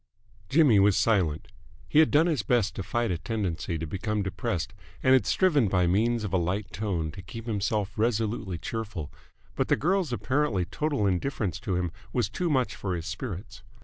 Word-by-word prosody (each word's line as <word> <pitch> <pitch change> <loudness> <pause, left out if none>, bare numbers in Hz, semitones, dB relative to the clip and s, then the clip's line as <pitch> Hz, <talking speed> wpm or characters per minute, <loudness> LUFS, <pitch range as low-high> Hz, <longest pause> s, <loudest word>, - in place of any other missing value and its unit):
Jimmy 140 -8 +5
was 100 0 +4
silent. 90 -9 +1 0.4
He 145 - +4
had 160 - +6
done 155 +2 +4
his 155 -9 +1
best 115 -2 +1
to - - -3
fight 120 +3 -1
a 85 - -2
tendency 90 -5 -2
to 80 - -4
become 105 +5 -2
depressed 90 -1 -3 0.3
and 130 - +5
had 130 -5 +4
striven 150 - +3
by 90 -2 +2
means 110 +6 +2
of 100 -3 -4
a - - +4
light 90 +3 -2
tone 90 -6 -2
to 95 - -9
keep 110 +5 -9
himself 105 -2 -1
resolutely 110 -4 0
cheerful, 105 -5 -5 0.4
but - - 0
the - - +4
girl's 180 -1 +1
apparently 120 -6 0
total 140 - -1
indifference 100 - -1
to 100 -5 -2
him 90 -1 -1 0.2
was 120 -4 +1
too 175 +9 -2
much 130 -7 +1
for 95 -3 -3
his 85 -1 -5
spirits. 105 -1 -6
105 Hz, 185 wpm, -27 LUFS, 95-120 Hz, 0.4 s, had